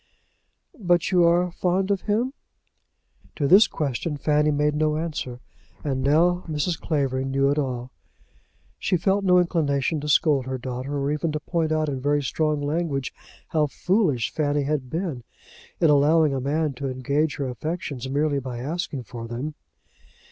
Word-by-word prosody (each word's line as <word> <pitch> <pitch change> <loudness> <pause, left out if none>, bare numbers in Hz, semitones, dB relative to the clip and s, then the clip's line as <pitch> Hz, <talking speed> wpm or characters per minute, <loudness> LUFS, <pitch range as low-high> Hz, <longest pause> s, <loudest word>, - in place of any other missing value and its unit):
"But 175 -3 +2
you 180 -2 +5
are 175 +1 +3
fond 185 +3 0
of 195 -2 0
him?" 240 +6 +1 1.0
To 145 - 0
this 195 +8 +7
question 145 +1 -3
Fanny 150 +1 +2
made 150 0 +1
no 155 0 +1
answer, 150 -6 -4 0.4
and 135 -3 -1
now 170 +6 +3
Mrs. 160 +2 -1
Clavering 135 -4 -1
knew 135 +1 +2
it 145 - +1
all. 125 -3 -3 0.9
She 180 - +1
felt 195 +3 +1
no 180 -1 +5
inclination 155 -4 +1
to 150 - -4
scold 145 -3 +3
her 130 0 -2
daughter, 130 +3 -4
or 140 +1 -1
even 150 +2 -1
to 150 - -1
point 160 0 -1
out 155 0 +1
in 135 -3 -3
very 145 +1 +1
strong 150 +2 0
language 145 -3 -2 0.4
how 155 -2 +2
foolish 165 - 0
Fanny 145 -1 0
had 140 -3 -2
been 160 -7 -3 0.6
in 160 -3 +4
allowing 150 +1 +4
a 135 - -2
man 150 +2 0
to 135 +1 -4
engage 140 +4 0
her 140 - -3
affections 135 0 -4
merely 145 +1 +1
by 130 -2 -6
asking 145 0 -4
for 115 +1 -8
them. 125 +6 -4
150 Hz, 160 wpm, -24 LUFS, 135-165 Hz, 1.0 s, this